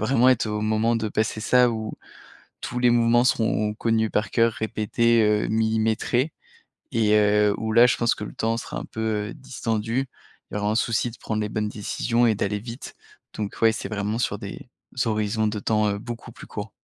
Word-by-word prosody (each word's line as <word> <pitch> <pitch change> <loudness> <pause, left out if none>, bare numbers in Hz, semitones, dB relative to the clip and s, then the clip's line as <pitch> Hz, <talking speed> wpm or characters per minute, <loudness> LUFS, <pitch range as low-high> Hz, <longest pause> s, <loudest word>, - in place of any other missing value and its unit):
vraiment 130 0 +4
être 125 -3 +2
au 105 0 -2
moment 110 +2 +1
de 110 -1 -2
passer 110 0 -1
ça 125 +2 +4
où 110 -1 -4 0.7
tous 125 - -4
les 125 0 +4
mouvements 120 0 +4
seront 110 -3 +1
connus 110 0 +1
par 105 +2 -1
cœur, 115 -1 +3
répétés, 110 +1 +1
heu, 105 -1 +2
millimétrés 110 +5 +1 0.6
et, 110 -2 +2
heu, 105 0 +4
où 110 0 -3
là, 120 +2 +7
je - - +2
pense 120 0 +2
que 105 - -6
le - - -9
temps 115 +1 0
sera - - -6
un - - -5
peu, 110 -2 -2
heu, - - -7
distendu. 120 -2 -2 0.4
Il - - -6
y - - 0
aura 105 0 0
un 110 - 0
souci 115 +1 0
de 115 - -14
prendre 110 -1 -3
les 105 - -1
bonnes 105 -1 -2
décisions 115 +3 0
et 110 - +2
d'aller 105 +1 -1
vite, 115 +4 -8 0.4
donc 105 -2 -4
ouais, 115 -1 +6
c'est 110 - -5
vraiment 105 +1 -2
sur 100 -4 -1
des 115 +7 -9 0.4
horizons 110 0 0
de 105 0 -2
temps, 105 +1 +1
heu, 100 - -3
beaucoup 115 +2 -8
plus - - -12
courts. 105 +1 -7
110 Hz, 205 wpm, -24 LUFS, 105-115 Hz, 0.7 s, là